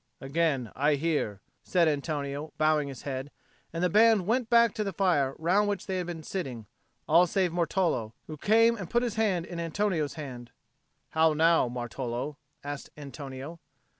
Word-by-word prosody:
"Again 135 -4 0
I 145 +2 +3
hear," 145 -10 -1 0.2
said 175 -3 +2
Antonio, 145 0 -2
bowing 155 -2 +2
his 135 -4 -8
head; 135 0 -4 0.4
and 165 +2 -3
the - - +5
band 215 0 +5
went 230 +3 0
back 235 -2 +5
to 215 - -2
the 200 - -2
fire 155 -8 +1
round 190 +6 +2
which 200 -3 -2
they 190 -1 -2
had 180 - -3
been 165 -2 -6
sitting, 130 - -5 0.4
all 170 +3 +5
save 185 0 +1
Martolo, 165 - 0
who 155 - -7
came 225 +8 +4
and 185 -6 -7
put 240 +1 +2
his 240 -3 -1
hand 205 -6 +1
in 175 -2 -7
Antonio's 170 -3 -1
hand. 125 -6 -7 0.6
"How 160 0 +4
now, 160 -3 +4
Martolo?" 125 +3 -4 0.3
asked 145 0 -6
Antonio. 140 +2 -8
160 Hz, 165 wpm, -28 LUFS, 140-185 Hz, 0.6 s, the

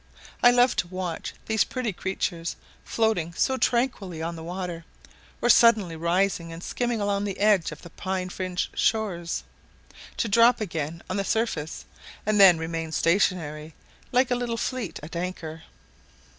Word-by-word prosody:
I 245 - +8
love 245 +1 +4
to 175 - 0
watch 185 -1 -5
these 220 -1 +2
pretty 250 -5 -3
creatures, 175 -2 -3 0.3
floating 215 -7 0
so 265 +9 +1
tranquilly 235 -10 0
on 165 +1 -3
the 160 - -8
water, 175 -1 -5 0.6
or - - +3
suddenly 220 -8 +5
rising 170 +1 0
and 165 +1 -8
skimming 240 -2 -1
along 200 0 0
the 195 -2 -4
edge 205 -4 +3
of - - -10
the 170 - -11
pine 185 -1 -3
fringed 180 -1 -3
shores, 185 -7 0 0.7
to 230 - 0
drop 230 +3 +5
again 165 -5 -4
on 185 - -3
the 200 - 0
surface, 195 -8 -2 0.4
and 210 0 +2
then 185 -4 +9
remain 165 0 -4
stationary, 160 -3 0 0.4
like 255 0 +3
a - - +4
little 240 -1 -2
fleet 230 -9 -3
at 160 +3 -8
anchor. 170 -2 -5
185 Hz, 155 wpm, -26 LUFS, 165-220 Hz, 0.7 s, then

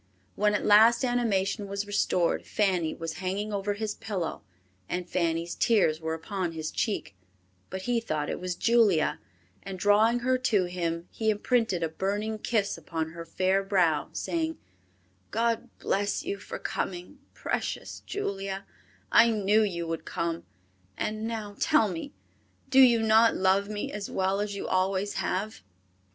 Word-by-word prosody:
When 210 0 +2
at - - -1
last 225 +4 +6
animation 210 -4 0
was 200 +1 -3
restored, 205 -4 +1
Fanny 185 -6 0
was 165 -1 -5
hanging 200 +3 -2
over 200 0 -1
his 215 0 -3
pillow, 190 -7 -4 0.5
and 180 0 -3
Fanny's 170 -1 -1
tears 175 -9 +2
were 160 0 -2
upon 175 +1 -3
his 155 -1 -4
cheek; 200 - -2 0.6
but 190 0 -5
he 240 +1 +1
thought 155 -10 -2
it - - -3
was 180 -1 -3
Julia, 220 -9 +3 0.4
and 195 -1 -7
drawing 215 +5 +4
her 255 +1 +2
to 220 -7 +2
him, 170 -1 -3
he 220 -1 -1
imprinted 215 -4 +1
a - - +2
burning 205 +6 -2
kiss 210 -3 0
upon 160 -2 -4
her 170 0 -7
fair 190 +3 +1
brow, 180 -6 +1
saying, 325 -1 -2 0.7
"God 230 +2 0
bless 205 +7 -1
you 395 +3 -2
for - - -7
coming, 180 -1 -4 0.2
precious - - -3
Julia, 195 - -4 0.5
I 235 0 +7
knew 210 -1 +3
you 175 -5 -1
would 165 0 -4
come; 170 0 -3 0.5
and 215 +1 -2
now 215 -3 -5
tell 305 -8 +4
me, 170 -3 -5 0.6
do 265 0 +5
you 240 -3 +7
not 220 +1 +5
love 190 +2 +2
me 210 -1 -4
as 205 -1 -5
well 190 +1 0
as 205 -1 -3
you - - -4
always 190 +2 0
have?" 210 +4 -2
200 Hz, 155 wpm, -28 LUFS, 180-220 Hz, 0.7 s, I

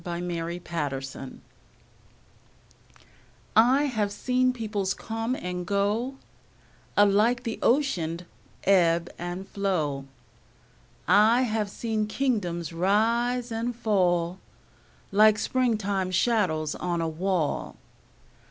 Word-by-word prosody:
Paul 175 -1 -4
Laurence 175 0 -4 0.4
Dunbar - - -8
Old 135 - -10 2.2
I 250 +6 +5
HAVE 220 -8 -1
seen 255 +3 +1
peoples 215 -5 -2
come 225 +3 -3
and 180 -5 -4
go 205 +7 0 0.8
Alike 210 +4 +4
the 230 -2 -4
Ocean'd 180 - +1 0.4
ebb 170 -3 +3
and 175 +2 -5
flow; 155 -9 -1 1.0
I 215 +6 +5
have 215 -3 -1
seen 215 0 -2
kingdoms 205 - -1
rise 230 +7 +1
and 230 +2 -2
fall 180 -5 +1 0.7
Like 215 +1 +6
springtime 210 -7 0
shadows 185 -6 +1
on 175 -1 -2
a 165 - 0
wall. 170 -1 -1
200 Hz, 95 wpm, -26 LUFS, 175-230 Hz, 2.2 s, Like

